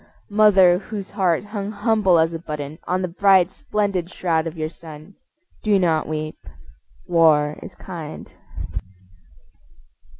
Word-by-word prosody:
Mother 195 Hz, -4 st, +5 dB
whose 205 Hz, -1 st, -7 dB
heart 185 Hz, -5 st, +1 dB
hung 205 Hz, -1 st, -5 dB
humble 210 Hz, -4 st, +2 dB
as 165 Hz, +1 st, +2 dB
a 165 Hz, -, -4 dB
button 150 Hz, -2 st, -6 dB
On 185 Hz, +1 st, 0 dB
the -, -, 0 dB
bright 190 Hz, 0 st, +4 dB
splendid 200 Hz, -5 st, -2 dB
shroud 165 Hz, -3 st, -1 dB
of 165 Hz, +1 st, -7 dB
your 155 Hz, 0 st, -2 dB
son, 155 Hz, +2 st, -12 dB, 0.5 s
Do 210 Hz, -2 st, +3 dB
not 165 Hz, -4 st, +1 dB
weep. 155 Hz, 0 st, -4 dB, 0.7 s
War 155 Hz, -4 st, +3 dB
is -, -, -10 dB
kind. 165 Hz, -5 st, -9 dB
175 Hz, 130 wpm, -22 LUFS, 160-200 Hz, 0.7 s, Mother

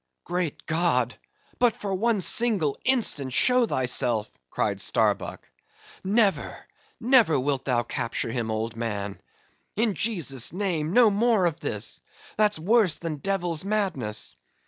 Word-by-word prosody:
"Great 170 Hz, -4 st, -3 dB
God! 140 Hz, -9 st, +1 dB, 0.4 s
but 240 Hz, -2 st, +3 dB
for 200 Hz, -5 st, -4 dB
one 215 Hz, +1 st, +1 dB
single 195 Hz, -9 st, +2 dB
instant 210 Hz, -, +1 dB
show 250 Hz, -, +4 dB
thyself," 125 Hz, -, 0 dB, 0.2 s
cried -, -, -1 dB
Starbuck; -, -, 0 dB, 0.6 s
"never, 200 Hz, 0 st, 0 dB, 0.3 s
never 235 Hz, -, +4 dB
wilt 135 Hz, 0 st, -2 dB
thou 120 Hz, -3 st, +1 dB
capture 115 Hz, 0 st, -3 dB
him, 115 Hz, -2 st, -3 dB
old 110 Hz, +1 st, -3 dB
man—In 115 Hz, -, -5 dB
Jesus' 165 Hz, -, 0 dB
name 175 Hz, -5 st, -2 dB
no 230 Hz, +1 st, +5 dB
more 215 Hz, -2 st, +2 dB
of 165 Hz, -2 st, -1 dB
this, -, -, -3 dB, 0.3 s
that's 210 Hz, -3 st, +3 dB
worse 190 Hz, 0 st, +2 dB
than 165 Hz, -3 st, -5 dB
devil's 175 Hz, 0 st, -2 dB
madness. 190 Hz, -, -2 dB
170 Hz, 125 wpm, -25 LUFS, 130-215 Hz, 0.6 s, no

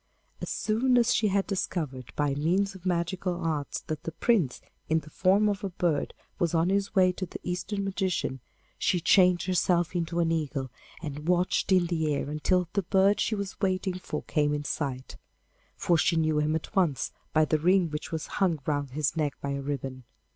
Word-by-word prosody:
As -, -, -4 dB
soon 245 Hz, +4 st, +1 dB
as 240 Hz, -1 st, +4 dB
she 220 Hz, -, +2 dB
had 195 Hz, 0 st, +1 dB
discovered 150 Hz, -, -3 dB
by 145 Hz, -2 st, +1 dB
means 180 Hz, +7 st, +1 dB
of 190 Hz, -1 st, -8 dB
magical 180 Hz, +1 st, -1 dB
arts 155 Hz, -4 st, -2 dB
that 155 Hz, -1 st, -5 dB
the 165 Hz, -, -5 dB
Prince 170 Hz, -, +1 dB, 0.3 s
in 160 Hz, -, +3 dB
the 155 Hz, -, -15 dB
form 195 Hz, +6 st, +3 dB
of 205 Hz, 0 st, -1 dB
a 195 Hz, -, -1 dB
bird 170 Hz, -5 st, -1 dB, 0.2 s
was 170 Hz, -1 st, +1 dB
on 165 Hz, +2 st, +3 dB
his 200 Hz, +2 st, 0 dB
way 185 Hz, -1 st, +5 dB
to 185 Hz, 0 st, -5 dB
the -, -, -7 dB
Eastern 185 Hz, +3 st, -3 dB
magician, 190 Hz, -8 st, -1 dB, 0.4 s
she 180 Hz, -, +2 dB
changed 180 Hz, +1 st, +4 dB
herself 180 Hz, -2 st, +1 dB
into 170 Hz, 0 st, -1 dB
an 165 Hz, -1 st, +2 dB
eagle 145 Hz, -5 st, -2 dB, 0.3 s
and 150 Hz, 0 st, -6 dB
watched 180 Hz, +2 st, +1 dB
in 185 Hz, -2 st, +5 dB
the 160 Hz, -3 st, 0 dB
air 140 Hz, -, -3 dB
until 180 Hz, +4 st, +1 dB
the 200 Hz, -, +2 dB
bird 195 Hz, +2 st, +3 dB
she 220 Hz, -, +1 dB
was 200 Hz, -1 st, -5 dB
waiting 185 Hz, -1 st, 0 dB
for 150 Hz, -4 st, -5 dB
came 150 Hz, -1 st, +1 dB
in 145 Hz, -, -3 dB
sight, 135 Hz, -3 st, -4 dB, 0.6 s
for 170 Hz, -2 st, +2 dB
she 170 Hz, -, +3 dB
knew 155 Hz, -2 st, +2 dB
him 150 Hz, +1 st, +1 dB
at 160 Hz, -, -5 dB
once 165 Hz, -10 st, +1 dB, 0.2 s
by 155 Hz, 0 st, +4 dB
the 155 Hz, 0 st, +1 dB
ring 180 Hz, 0 st, +3 dB
which 150 Hz, 0 st, -5 dB
was 160 Hz, -1 st, -3 dB, 0.2 s
hung 180 Hz, -4 st, +3 dB
round 145 Hz, -2 st, -1 dB
his 145 Hz, -1 st, 0 dB
neck 150 Hz, -3 st, 0 dB
by 140 Hz, -, -3 dB
a 140 Hz, 0 st, -2 dB
ribbon. 135 Hz, -2 st, -4 dB
170 Hz, 200 wpm, -28 LUFS, 150-190 Hz, 0.6 s, way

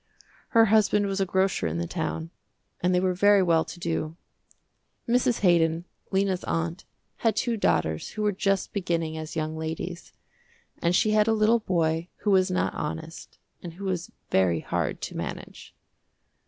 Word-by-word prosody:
Her 225 Hz, -, +8 dB
husband 210 Hz, -1 st, +3 dB
was 195 Hz, 0 st, -1 dB
a 190 Hz, -, +1 dB
grocer 190 Hz, -, +1 dB
in 80 Hz, +1 st, -3 dB
the 85 Hz, -, -1 dB
town, 80 Hz, 0 st, -4 dB, 0.5 s
and 180 Hz, -, +2 dB
they 180 Hz, -, +3 dB
were 185 Hz, 0 st, +1 dB
very 200 Hz, +1 st, +5 dB
well 165 Hz, -2 st, +3 dB
to 175 Hz, -, -10 dB
do. 165 Hz, -2 st, -2 dB, 0.9 s
Mrs. 245 Hz, 0 st, +2 dB
Haydon, 170 Hz, -2 st, +3 dB, 0.2 s
Lena's 190 Hz, -1 st, 0 dB
aunt, 165 Hz, +2 st, -2 dB, 0.3 s
had 225 Hz, -3 st, +1 dB
two 235 Hz, +1 st, 0 dB
daughters 80 Hz, -, 0 dB
who 215 Hz, -, -3 dB
were 210 Hz, -, +3 dB
just 195 Hz, 0 st, 0 dB
beginning 170 Hz, -5 st, -1 dB
as 160 Hz, 0 st, -6 dB
young 155 Hz, 0 st, -2 dB
ladies, 160 Hz, +2 st, -5 dB, 0.7 s
and 170 Hz, +1 st, +2 dB
she 215 Hz, -, +3 dB
had 215 Hz, 0 st, +3 dB
a 225 Hz, -, +4 dB
little 220 Hz, +2 st, +3 dB
boy 165 Hz, -4 st, 0 dB
who 210 Hz, -, +1 dB
was 185 Hz, -1 st, +4 dB
not 185 Hz, -, 0 dB
honest 160 Hz, +2 st, -6 dB, 0.2 s
and 170 Hz, -2 st, -7 dB
who 190 Hz, +4 st, -10 dB
was 180 Hz, -3 st, -2 dB, 0.2 s
very 90 Hz, -4 st, +3 dB
hard -, -, -2 dB
to -, -, -5 dB
manage. -, -, -7 dB
180 Hz, 170 wpm, -26 LUFS, 160-200 Hz, 0.9 s, Her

